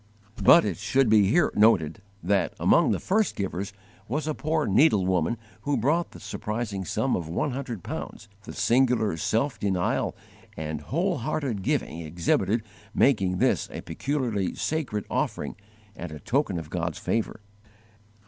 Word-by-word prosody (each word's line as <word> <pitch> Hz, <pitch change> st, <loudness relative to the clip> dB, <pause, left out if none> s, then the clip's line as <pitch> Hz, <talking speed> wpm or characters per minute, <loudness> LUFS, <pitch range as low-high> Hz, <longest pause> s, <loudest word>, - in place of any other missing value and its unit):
But 170 Hz, -, +8 dB
it 95 Hz, -6 st, -2 dB
should 110 Hz, +3 st, +2 dB
here 110 Hz, -, +4 dB
be -, -, -4 dB
noted 100 Hz, -6 st, +4 dB, 0.2 s
that, 100 Hz, +2 st, +1 dB
among -, -, +4 dB
the -, -, +1 dB
first 215 Hz, +2 st, +1 dB
givers, 100 Hz, 0 st, -3 dB, 0.4 s
was 150 Hz, +7 st, -2 dB
a 155 Hz, -, -1 dB
poor 155 Hz, 0 st, -1 dB
needlewoman 95 Hz, -, +3 dB, 0.2 s
who 145 Hz, -1 st, 0 dB
brought 155 Hz, +9 st, +1 dB
the -, -, -13 dB
surprising 105 Hz, -3 st, -4 dB
sum -, -, 0 dB
of 80 Hz, -3 st, -4 dB
one 140 Hz, -, -1 dB
hundred 125 Hz, -, -5 dB
pounds, 105 Hz, -, -6 dB, 0.2 s
the -, -, -8 dB
singular 120 Hz, -6 st, +2 dB
self 115 Hz, -, 0 dB
denial 95 Hz, -3 st, 0 dB, 0.4 s
and 75 Hz, -1 st, -4 dB
whole 170 Hz, -, -1 dB
hearted 140 Hz, -9 st, -2 dB
giving 85 Hz, -, -1 dB
exhibited 90 Hz, +7 st, 0 dB, 0.3 s
making 95 Hz, -9 st, +3 dB
this -, -, +1 dB
a -, -, -6 dB
peculiarly 120 Hz, -9 st, -2 dB
sacred 140 Hz, -10 st, -2 dB
offering -, -, -2 dB, 0.4 s
and 90 Hz, -2 st, -7 dB
a 75 Hz, -, -8 dB
token 125 Hz, -, 0 dB
of 80 Hz, -2 st, -7 dB
God's 85 Hz, -2 st, -2 dB
favour. 115 Hz, -1 st, -2 dB
105 Hz, 150 wpm, -26 LUFS, 90-140 Hz, 0.4 s, But